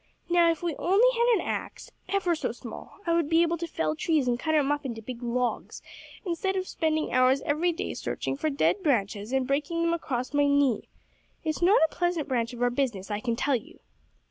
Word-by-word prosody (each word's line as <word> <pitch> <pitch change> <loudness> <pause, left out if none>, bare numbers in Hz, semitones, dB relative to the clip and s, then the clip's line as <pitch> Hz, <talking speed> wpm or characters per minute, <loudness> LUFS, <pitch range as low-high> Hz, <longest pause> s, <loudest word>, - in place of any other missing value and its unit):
Now, 345 -1 +5
if 330 0 -1
we 335 -4 -1
only 410 +7 +4
had 470 +1 +2
an - - 0
axe - - -5 0.2
ever 390 -3 +1
so 325 - -2
small - - -10
I 335 - +1
would 335 -3 +1
be 330 +1 +5
able 340 0 0
to 340 - -3
fell 155 - -1
trees 300 - +1
and 240 -1 +1
cut 315 +2 0
'em 290 -2 +3
up 290 0 -1
into 235 -5 -5
big 235 +2 -8
logs, 245 0 -2 0.4
instead 375 +2 -1
of 375 -1 -2
spending 315 -1 -1
hours 255 +2 +4
every 320 +4 +1
day 330 - -4
searching - - -3
for 310 +3 -1
dead 305 +7 +1
branches 215 - 0
and 265 -1 +1
breaking 300 +5 -1
them 335 0 +2
across 255 -6 -3
my 290 0 +3
knee. 280 -4 +2 0.5
It's 315 0 -2
not 380 +6 +5
a - - -19
pleasant 350 -4 -1
branch 235 -3 -1
of 245 0 -4
our 245 - +3
business, 235 -7 -2
I 205 - -1
can 235 +1 -1
tell 280 +3 +1
you." 305 +9 -7
290 Hz, 220 wpm, -27 LUFS, 250-335 Hz, 0.5 s, Now